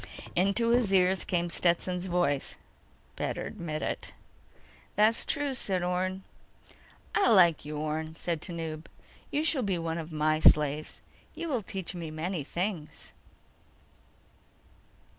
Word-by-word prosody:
Into 200 +6 +2
his 235 -4 +3
ears 190 -1 +3
came 175 -1 -1
Stetson's 180 +1 +1
voice: 175 -6 0 0.6
"Better - - -3
admit 155 -2 -5
it." - - -3 0.8
"That's 215 +3 +4
true," 290 -2 0
said 190 -8 -1
Orne. 185 +1 -1 0.9
"I 400 - +4
like 175 -9 +5
you, 150 0 -5
Orne," 155 +1 -3
said 165 -2 -2
Tanub. 165 -2 -5 0.4
"You 295 - 0
shall 315 -4 +3
be 195 -5 0
one 165 0 -2
of 160 0 -7
my 155 0 +1
slaves. 150 -1 +3 0.3
You 335 - -4
will 255 -6 0
teach 190 -2 -5
me 170 -3 -5
many 160 +1 -3
things." 175 +1 -4
175 Hz, 125 wpm, -29 LUFS, 160-195 Hz, 0.9 s, like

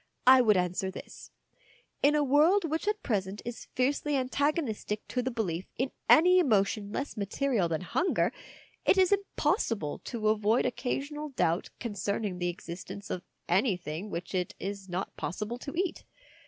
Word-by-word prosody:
" - - -44
I 260 - +6
would 215 -5 +4
answer 180 +1 0
this: 190 - -10 0.7
In 290 +2 +5
a 300 - +3
world 310 +8 +4
which 320 +5 -2
at 420 0 0
present 200 -3 -1
is 240 -1 -6
fiercely 285 +3 +1
antagonistic 260 -5 -1
to 250 - 0
the 255 - -1
belief 190 -8 -2
in 260 +2 -1 0.2
any 360 +3 +7
emotion 205 - +2
less 280 - -3
material 210 -1 0
than 160 0 -1
hunger, 330 - +1 0.5
it - - +4
is 375 0 +4
impossible 315 - 0
to 220 -3 -1
avoid 215 +2 +2
occasional 285 +4 -2
doubt 170 - 0
con 235 -4 -4
cerning 200 -1 -2
the 175 0 0
existence 175 +3 -7
of 180 - -2 0.3
anything 180 - 0
which 170 0 -5
it 180 -2 -1
is 195 -1 -5
not 180 +2 -3
possible 215 +6 -4
to 280 - -6
eat. 365 0 -1
220 Hz, 160 wpm, -30 LUFS, 190-285 Hz, 0.7 s, any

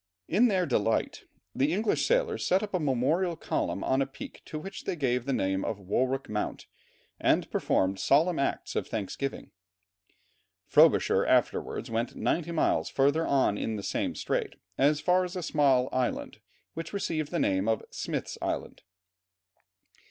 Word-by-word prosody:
In 225 +8 +4
their 190 -5 +1
delight, 115 -6 0 0.3
the 140 +3 +1
English 210 +5 +1
sailors 485 -3 +1
set 190 +3 +2
up 205 - -6
a 185 - +1
memorial 155 +6 +1
column - - -2
on 130 +1 +2
a 135 - 0
peak 135 0 -10
to 155 - -6
which 195 +6 -8
they - - -1
gave 125 -5 0
the 140 - -1
name 95 -5 0
of 110 - -2
Warwick 130 +8 -1
Mount, 105 0 -3 0.5
and - - +2
performed 95 +1 +1
solemn 160 - +3
acts 140 - -2
of - - -1
thanksgiving. 110 +6 -4 1.1
Frobisher - - +4
afterwards - - 0
went 115 +2 -2
ninety 170 0 -1
miles 165 - +1
further 140 +4 +2
on 130 -7 +2
in 110 - -2
the 100 - -5
same - - -2
strait, - - -2 0.2
as 145 +4 +3
far 180 +3 +3
as 180 +1 -5
a 180 - -3
small 135 -5 +3
island, 130 -1 -2 0.3
which 165 +2 -6
received 155 -6 -2
the 175 - -2
name 95 - +1
of 110 0 +1
Smith's - - -4
Island. - - -3
140 Hz, 160 wpm, -28 LUFS, 120-175 Hz, 1.1 s, In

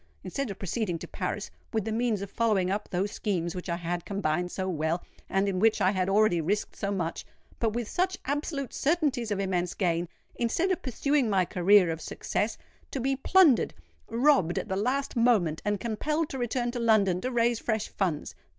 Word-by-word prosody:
Instead 275 +7 -3
of 200 - -6
proceeding 195 -2 -2
to - - -8
Paris—with 220 -3 -4
the 220 - -2
means 225 -3 0
of 200 - -8
following 205 -6 +1
up 205 +1 -2
those 190 +3 -1
schemes 175 -5 -2
which 180 0 -6
I 170 - +1
had 175 0 -3
combined 180 -3 -1
so 190 -1 -3
well, 165 0 -1 0.3
and 195 +1 +1
in 190 -2 0
which 220 +2 +4
I 185 - +4
had 185 -1 0
already 195 -4 +3
risked 200 +6 -1
so 200 - -3
much—but 200 +4 -4
with 240 -1 -2
such 370 +5 0
absolute 285 -1 -2
certainties 280 -7 +1
of 205 -2 -1
immense 180 -2 -1
gain,—instead 195 - -1
of 370 - 0
pursuing 275 0 +1
my 190 -3 +3
career 180 0 +4
of 160 0 -5
success,—to 220 - -4
be 270 +2 +1
plundered—robbed 265 - +2
at - - -3
the 190 - 0
last 255 +9 -1
moment—and 205 -4 +2
compelled 300 - -1
to 265 - -5
return 240 0 -1
to 240 - -4
London 205 -6 +3
to 255 - -1
raise 235 -1 +2
fresh 220 -2 -1
funds! 175 -7 -2
210 Hz, 180 wpm, -28 LUFS, 185-245 Hz, 0.3 s, which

